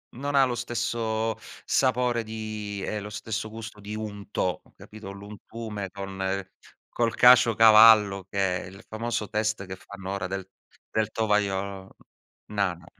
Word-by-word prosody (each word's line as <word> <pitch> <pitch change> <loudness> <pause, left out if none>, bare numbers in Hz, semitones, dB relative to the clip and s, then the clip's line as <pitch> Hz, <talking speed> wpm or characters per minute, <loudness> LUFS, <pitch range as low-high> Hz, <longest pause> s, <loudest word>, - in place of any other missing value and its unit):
non 140 +3 -3
ha 135 -1 +6
lo 125 - -2
stesso 115 -2 -2 0.3
sapore 125 -2 +2
di 110 -2 -5
ehm, 105 -1 -3
lo 105 - -7
stesso 110 +1 -4
gusto 110 -1 -9
di 105 +1 -7
unto, 105 -3 -3
capito? 110 -2 -10
L'untume 105 +1 -7
con 95 -1 -3 0.5
col 115 -1 0
caciocavallo, 110 -5 +7
che 95 -2 0
è - - -9
il 95 +1 -13
famoso 110 -1 -3
test 110 -2 -1
che 95 0 -7
fanno 95 0 -9
ora 95 -2 -3
del 95 0 -5 0.4
del 110 -1 0
tovagliolo. 100 -3 -1 0.6
Ma 100 -3 +1
no. 85 -1 -16
105 Hz, 140 wpm, -26 LUFS, 100-115 Hz, 0.6 s, caciocavallo